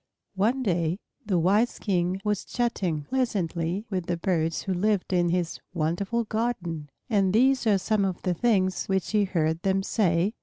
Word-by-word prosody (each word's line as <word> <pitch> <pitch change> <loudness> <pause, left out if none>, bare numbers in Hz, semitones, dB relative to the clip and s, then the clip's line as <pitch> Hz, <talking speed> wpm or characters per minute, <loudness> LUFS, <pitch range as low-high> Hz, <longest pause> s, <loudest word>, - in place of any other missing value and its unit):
One 225 +7 +1
day 170 -4 0 0.3
the 190 -4 +2
wise 200 +8 +2
King 185 -1 0
was 210 -2 0
chatting 190 - -1
pleasantly 185 - -1
with 185 -3 -2
the 175 - -1
birds 165 -2 0
who 190 - -1
lived 195 +1 0
in 175 -1 +3
his 175 -1 -1 0.2
wonderful 185 +9 0
garden, 190 -10 -3 0.2
and 195 -5 +2
these 260 +2 +3
are 205 -2 +5
some 210 +2 +1
of 190 -2 -1
the 180 - +1
things 190 -2 +1
which 190 -2 0
he 210 -2 +3
heard 160 -3 0
them 195 0 +1
say. 190 -1 +1
190 Hz, 165 wpm, -26 LUFS, 175-215 Hz, 0.3 s, are